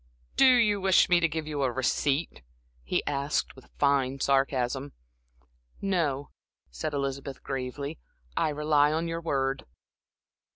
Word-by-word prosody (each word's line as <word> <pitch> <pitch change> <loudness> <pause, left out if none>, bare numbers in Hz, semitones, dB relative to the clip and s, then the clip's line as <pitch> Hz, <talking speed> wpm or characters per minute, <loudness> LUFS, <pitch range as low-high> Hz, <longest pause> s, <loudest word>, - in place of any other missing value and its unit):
"Do 270 - +6
you 210 -4 +3
wish 190 -1 +4
me 175 -1 +5
to 170 - +3
give 160 -1 -4
you 150 -2 -3
a 130 -2 +1
receipt?" 135 - 0 0.4
he - - -1
asked, 140 0 -1
with 130 - -16
fine 140 -2 +2
sarcasm. 135 0 0 0.9
"No," 160 -8 -1 0.4
said 60 - -4
Elizabeth, 140 -1 -4
gravely. 140 +3 -4 0.4
"I - - +1
rely 150 0 +2
on 165 +2 -1
your 165 0 -3
word." 135 -4 -1
145 Hz, 130 wpm, -28 LUFS, 135-160 Hz, 0.9 s, Do